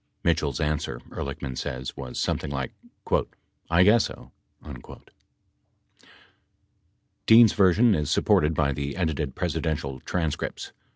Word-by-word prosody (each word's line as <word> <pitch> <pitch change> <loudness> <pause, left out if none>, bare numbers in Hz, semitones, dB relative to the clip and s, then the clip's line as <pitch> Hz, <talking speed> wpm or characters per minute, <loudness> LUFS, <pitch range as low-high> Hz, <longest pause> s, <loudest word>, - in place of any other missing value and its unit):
Mitchell's 80 -5 0
answer, 75 -5 -2
Ehrlichman 70 -1 -5
says, 65 +1 -5
was 65 -2 -7
something - - -1
like 65 -2 -3 1.0
"I 85 +2 +5
guess 105 +3 +5
so." - - -10 0.3
23 - - -10 2.3
Dean's 115 -1 +8
version 100 +5 +4
is 75 -5 -1
supported 75 +2 +2
by 70 -2 +1
the 70 +1 -4
edited 80 -6 -2
Presidential 70 -4 -2
tran 80 -4 -1
scripts. - - -5
75 Hz, 115 wpm, -25 LUFS, 70-90 Hz, 2.3 s, Dean's